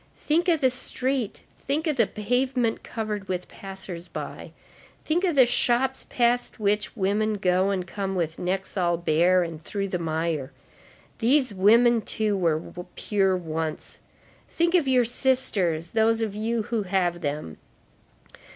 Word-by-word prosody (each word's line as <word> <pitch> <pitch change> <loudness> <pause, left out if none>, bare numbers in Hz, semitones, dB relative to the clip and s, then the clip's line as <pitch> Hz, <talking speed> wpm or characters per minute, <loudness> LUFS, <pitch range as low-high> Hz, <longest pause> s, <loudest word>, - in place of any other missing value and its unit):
Think 330 +4 +1
of 325 -3 +2
the 260 -1 +4
street, 250 -2 -2 0.2
think 295 +4 -1
of 310 -3 +1
the 230 -5 +3
pavement 245 +1 0
covered 210 -3 -4
with 180 -1 -3
passers 190 -3 -8
by, 170 - -7 0.5
think 335 +4 +1
of 350 -5 +1
the 260 -2 +7
shops 245 +2 +1
past 245 0 +1
which 210 +2 0
women 210 +2 +1
go 185 0 +2
and 190 -2 -1
come 195 0 -4
with 165 -3 -2
necks 190 +2 -3
all 175 -2 +1
bare, 175 +2 +3
and 165 -2 -7
through 195 +2 -3
the 180 - -2
mire. 160 -4 -2 0.7
These 255 0 +3
women, 230 +4 +5
too, 215 -1 -1
were 165 -5 +1 0.4
pure 195 -3 +1
once. 160 -2 -4 0.5
Think 340 +1 +1
of 340 -6 +3
your 255 -2 +4
sisters, 200 - 0
those 225 0 +2
of 215 -3 -3
you 220 +2 -1
who 230 0 -2
have 180 -3 0
them. 145 - -4
205 Hz, 150 wpm, -25 LUFS, 180-245 Hz, 0.7 s, the